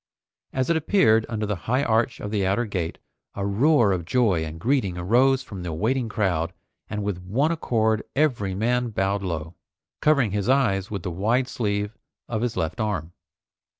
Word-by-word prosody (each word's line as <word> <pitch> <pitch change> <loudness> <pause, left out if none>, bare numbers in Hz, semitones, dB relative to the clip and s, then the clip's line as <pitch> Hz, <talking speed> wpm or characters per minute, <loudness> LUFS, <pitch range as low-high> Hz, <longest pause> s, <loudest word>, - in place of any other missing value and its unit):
As 130 +4 0
it - - +3
appeared 130 - +3
under 110 -2 -2
the 105 0 -1
high 130 +3 +2
arch 115 0 +1
of 105 - -5
the 105 -2 0
outer 100 +6 +1
gate, 90 -6 -3 0.4
a 100 - -2
roar 115 +2 +4
of 90 -2 -1
joy 95 -3 +2
and 80 +1 -6
greeting 110 -5 0
arose 125 +9 +3
from 95 -4 -8
the 90 -1 -4
waiting 115 +8 0
crowd 90 -7 0 0.4
and 105 0 -3
with 100 -3 -3
one 125 - +1
accord 110 -9 +1
every 120 -10 +1
man 120 +4 +1
bowed 100 -1 0
low, 85 -3 -4 0.5
covering 140 -8 +3
his 100 +2 -1
eyes 110 -8 +2
with 100 -5 -4
the 90 - -3
wide 115 +9 +1
sleeve 105 -3 -2 0.3
of 110 -2 -2
his 120 -1 -2
left 80 +8 -2
arm. 90 -6 -2
105 Hz, 180 wpm, -24 LUFS, 95-125 Hz, 0.5 s, roar